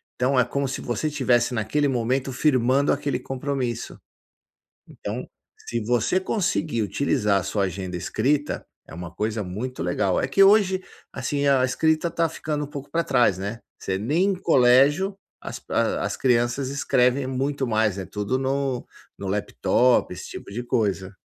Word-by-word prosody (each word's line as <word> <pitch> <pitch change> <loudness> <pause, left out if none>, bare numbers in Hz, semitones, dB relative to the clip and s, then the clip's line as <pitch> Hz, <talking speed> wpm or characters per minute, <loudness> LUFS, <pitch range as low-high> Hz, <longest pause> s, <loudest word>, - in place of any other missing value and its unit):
então 130 +1 +2
é 125 - +4
como 140 +2 -1
se 130 - -4
você 120 +6 -2
estivesse 125 -4 +2
naquele 125 +6 0
momento 130 +2 0
firmando 130 0 +2
aquele 140 -3 -2
compromisso. 130 -2 -4 0.9
Então, - - -6 0.4
se 120 - -1
você 120 - +1
conseguir 170 - -1
utilizar 105 -3 +1
a - - -5
sua 100 +2 -1
agenda 95 -1 -4
escrita, 140 - -1 0.2
é - - -11
uma 85 0 -7
coisa 110 +2 -2
muito 110 +8 -5
legal. 90 +1 +1
É - - 0
que 135 +9 +4
hoje, 195 -2 +5 0.3
assim, 140 +2 -2
a 135 -2 +4
escrita 160 +5 +1
tá 165 0 +1
ficando 150 -2 -3
um - - -6
pouco 140 -1 -8
pra 170 - +1
trás, 120 -9 +3
né. 100 +4 -4 0.2
Você 95 - -2
nem 145 - +1
em - - -1
colégio 145 +4 +4 0.2
as - - -7
as - - 0
crianças 120 +1 +1
escrevem 135 -1 +2
muito 135 +1 -1
mais, 110 -4 +1
é 95 - -4
tudo 105 +7 -2
no 135 -1 -1 0.3
no 100 - -6
laptop, 105 +3 +2
esse 90 - -8
tipo - - -9
de 120 +4 -3
coisa. 100 -5 -1
130 Hz, 160 wpm, -24 LUFS, 110-140 Hz, 0.9 s, hoje